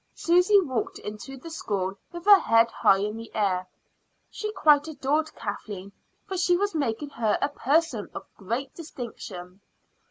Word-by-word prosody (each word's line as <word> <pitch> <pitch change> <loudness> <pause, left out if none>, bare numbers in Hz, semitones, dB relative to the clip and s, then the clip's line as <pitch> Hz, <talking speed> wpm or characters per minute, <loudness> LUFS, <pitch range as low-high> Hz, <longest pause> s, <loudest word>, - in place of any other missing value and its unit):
Susy 360 +4 +4
walked 260 - -2
into 215 +6 -8
the 330 +6 -10
school 195 - -2 0.2
with 345 0 -8
her 405 -1 +9
head 230 -4 +3
high 195 - +4
in 210 +2 -3
the 230 0 -8
air; 185 -4 0 0.6
she 425 -1 -4
quite 300 -6 +4
adored 305 +1 -1
Kathleen, 200 -2 -6 0.3
for 380 - -4
she 355 0 +3
was 405 +2 -1
making 285 -2 -2
her 225 -4 +1
a 285 - 0
person 285 -5 0
of - - -6
great 235 +7 -4
distinction. 210 - -8
265 Hz, 155 wpm, -26 LUFS, 210-325 Hz, 0.6 s, her